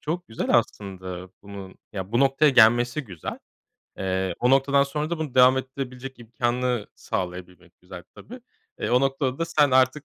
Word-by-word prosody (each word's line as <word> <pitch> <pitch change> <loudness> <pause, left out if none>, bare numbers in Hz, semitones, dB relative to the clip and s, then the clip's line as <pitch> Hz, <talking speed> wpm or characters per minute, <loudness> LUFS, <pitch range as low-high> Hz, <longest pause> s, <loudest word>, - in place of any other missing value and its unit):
çok 170 +4 -4
güzel 110 - -4
aslında 95 -4 -6
bunun 100 -2 -10 0.2
Ya, 95 +1 -6
bu 120 - +2
noktaya 140 +2 +4
gelmesi 120 +3 +4
güzel. 90 -8 -7 0.6
Eee, 95 -1 -1
o 125 - +3
noktadan 140 +1 +4
sonra 150 +3 -3
da 170 - -2
bunu 155 -5 -5
devam 130 +1 +6
ettirebilecek 130 0 -7
imkânı 120 0 -2
sağlayabilmek 90 -1 -6
güzel 90 -1 -11
tabii. 250 +2 -11 0.4
Eee, - - -2
o 125 +1 +4
noktada 135 -1 -1
da 165 - 0
sen 150 -4 +2
artık 130 +3 +3
125 Hz, 160 wpm, -24 LUFS, 95-135 Hz, 0.6 s, devam